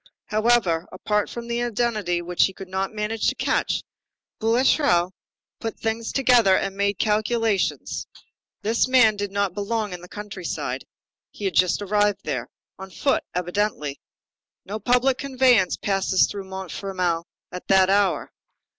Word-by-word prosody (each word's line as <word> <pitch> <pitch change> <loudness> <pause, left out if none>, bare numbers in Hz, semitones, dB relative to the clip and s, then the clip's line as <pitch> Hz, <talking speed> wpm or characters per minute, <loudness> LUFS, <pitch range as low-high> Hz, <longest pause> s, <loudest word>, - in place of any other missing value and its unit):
However, 215 -6 +2
apart 210 +3 -1
from 235 0 -7
the 235 0 -1
identity 215 -7 -1
which 175 0 +2
he 190 - -3
could 190 - -9
not 190 +1 -2
manage 215 +1 -2
to - - +1
catch, - - 0 0.6
Boulatruelle 225 - +3 0.5
put 225 -1 -5
things 225 0 -2
together 240 -8 +4
and 195 - -2
made 200 0 0
calculations. 215 -1 0 0.6
This 225 +4 +2
man 250 -5 +5
did 205 -1 -4
not 200 -2 0
belong 210 0 -2
in 175 - -7
the 180 - -11
country 205 -3 -8
side. - - -3 0.4
He 205 - -8
had 190 - 0
just 185 +2 +2
arrived 205 0 +1
there. - - -3 0.3
On 190 0 -8
foot, 270 - 0
evidently. 180 -5 -1 0.7
No 210 +3 -5
public 250 +4 +2
conveyance 255 -8 +3
passes 195 -1 +2
through 200 -1 -6
Montfermeil 185 -2 -3 0.3
at 180 - -8
that 190 -1 +5
hour. 200 -2 +1
205 Hz, 145 wpm, -24 LUFS, 190-225 Hz, 0.7 s, man